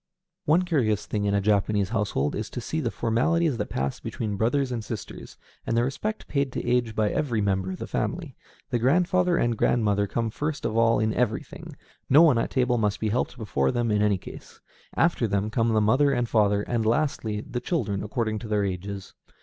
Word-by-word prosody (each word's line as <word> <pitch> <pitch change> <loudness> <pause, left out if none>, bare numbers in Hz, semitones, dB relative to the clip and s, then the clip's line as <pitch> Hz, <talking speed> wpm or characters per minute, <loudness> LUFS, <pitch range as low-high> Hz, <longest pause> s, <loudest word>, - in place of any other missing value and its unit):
One 165 +5 +4
curious 120 - 0
thing 105 -1 -2
in 100 0 +1
a 100 - +2
Japanese 100 -1 +1
household 105 - -1
is - - -4
to - - -5
see - - -3
the - - -1
formalities 130 +6 +1
that 105 - -3
pass 65 0 -2
between 105 -3 -4
brothers 125 +6 +1
and 115 -3 -3
sisters, 110 -3 -8 0.3
and 115 - -1
the 120 - +3
respect 210 - -3
paid 140 -2 0
to - - -4
age 120 -2 +1
by 105 -1 +1
every 120 -7 -1
member 95 -2 0
of 95 - -4
the - - -5
family. - - -3 0.4
The 120 - +1
grandfather 180 +6 +2
and 120 -1 +1
grandmother 105 -3 +1
come 115 +2 -2
first 150 +5 -3
of 110 - -1
all 115 0 +4
in 110 0 +1
everything, 110 -3 -3 0.3
no 150 +5 +7
one 145 -8 +5
at - - -1
table 125 -2 +1
must 105 -2 0
be 110 - -1
helped 125 +3 -1
before 70 - 0
them 120 -2 0
in 105 0 +2
any 105 -2 +3
case; - - -12 0.4
after 165 -8 +2
them 100 +1 -1
come 115 0 +1
the 110 - +3
father 130 +7 +3
and 120 -3 -1
mother; 105 -2 +3
and 115 0 -1
lastly, 110 -3 0
the 120 - -5
children 105 - -1
according 110 0 -2
to 110 - -8
their 105 -1 +1
ages. 95 +1 -5
110 Hz, 205 wpm, -26 LUFS, 105-125 Hz, 0.4 s, no